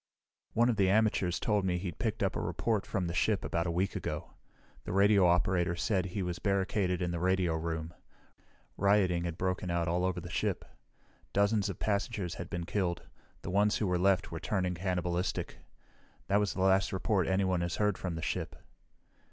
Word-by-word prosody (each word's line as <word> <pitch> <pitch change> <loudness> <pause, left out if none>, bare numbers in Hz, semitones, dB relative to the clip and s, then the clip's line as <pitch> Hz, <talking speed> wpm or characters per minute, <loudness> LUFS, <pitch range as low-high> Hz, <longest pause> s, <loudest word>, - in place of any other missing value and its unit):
"One 120 +1 +4
of 120 -3 +1
the 95 -2 +3
amateurs 100 -4 +2
told 105 -3 +1
me 90 -1 +1
he'd 90 -3 -5
picked - - -1
up - - 0
a - - -1
report 110 -4 -1
from 95 -4 -1
the 85 - -3
ship 100 +3 +1
about 85 +1 -1
a - - 0
week 95 +3 -1
ago. - - -4 0.5
The - - -5
radio 100 -1 +5
operator 85 0 +2
said 90 +1 0
he 95 +2 -3
was 90 -1 -3
barricaded 95 -2 0
in 90 - -1
the 85 - -2
radio 90 -1 +2
room. 80 0 -3 0.8
Rioting 95 -3 +3
had 85 -1 -4
broken 95 0 -1
out 85 0 0
all 90 +2 +1
over 90 -1 0
the 85 - -8
ship. - - -1 0.7
Dozens 100 0 +2
of 95 - -5
passengers 100 -3 -1
had 85 - -7
been 85 0 -3
killed; 90 -2 -1 0.4
the - - -4
ones 105 +2 +3
who 110 - 0
were 90 -2 +1
left 95 0 +2
were - - -4
turning 90 -3 -1
cannibalistic. 90 0 -2 0.7
That 100 +1 +2
was 105 -2 0
the 95 - -2
last 95 0 +3
report 95 -1 0
anyone 95 -2 +1
has 85 +1 -2
heard 105 -2 +1
from 90 -3 -4
the 80 - -5
ship." - - -3
95 Hz, 195 wpm, -31 LUFS, 85-100 Hz, 0.8 s, radio